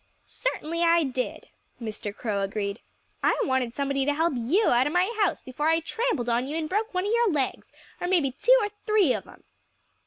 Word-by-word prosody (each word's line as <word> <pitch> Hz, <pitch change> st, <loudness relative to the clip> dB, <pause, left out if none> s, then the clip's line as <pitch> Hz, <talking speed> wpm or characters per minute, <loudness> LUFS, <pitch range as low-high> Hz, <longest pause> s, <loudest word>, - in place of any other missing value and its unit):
"Certainly 335 Hz, -9 st, -3 dB
I 335 Hz, 0 st, +4 dB
did," 255 Hz, -2 st, -4 dB, 0.3 s
Mr. 215 Hz, -2 st, -5 dB
Crow 205 Hz, -1 st, -3 dB
agreed. 200 Hz, +1 st, -3 dB, 0.4 s
"I -, -, +2 dB
wanted 260 Hz, -3 st, 0 dB
somebody 275 Hz, -1 st, 0 dB
to 290 Hz, +1 st, +1 dB
help 325 Hz, +1 st, +1 dB
you 285 Hz, -, +2 dB
out 245 Hz, +3 st, +3 dB
of 295 Hz, -, -3 dB
my 370 Hz, +6 st, +2 dB
house, 390 Hz, -, 0 dB
before 275 Hz, +4 st, -2 dB
I 325 Hz, 0 st, +3 dB
trampled 330 Hz, -, -2 dB
on 240 Hz, +2 st, +1 dB
you 300 Hz, +3 st, -3 dB
and 320 Hz, -1 st, -2 dB
broke 425 Hz, +6 st, -1 dB
one 365 Hz, +1 st, 0 dB
of 415 Hz, -, 0 dB
your 470 Hz, -1 st, +3 dB
legs 275 Hz, -5 st, -2 dB, 0.3 s
or 355 Hz, -, -2 dB
maybe 340 Hz, -8 st, +2 dB
two -, -, +4 dB
or 415 Hz, -, -1 dB, 0.2 s
three 415 Hz, -11 st, +4 dB
of -, -, -5 dB
'em." -, -, -16 dB
295 Hz, 205 wpm, -26 LUFS, 250-365 Hz, 0.4 s, I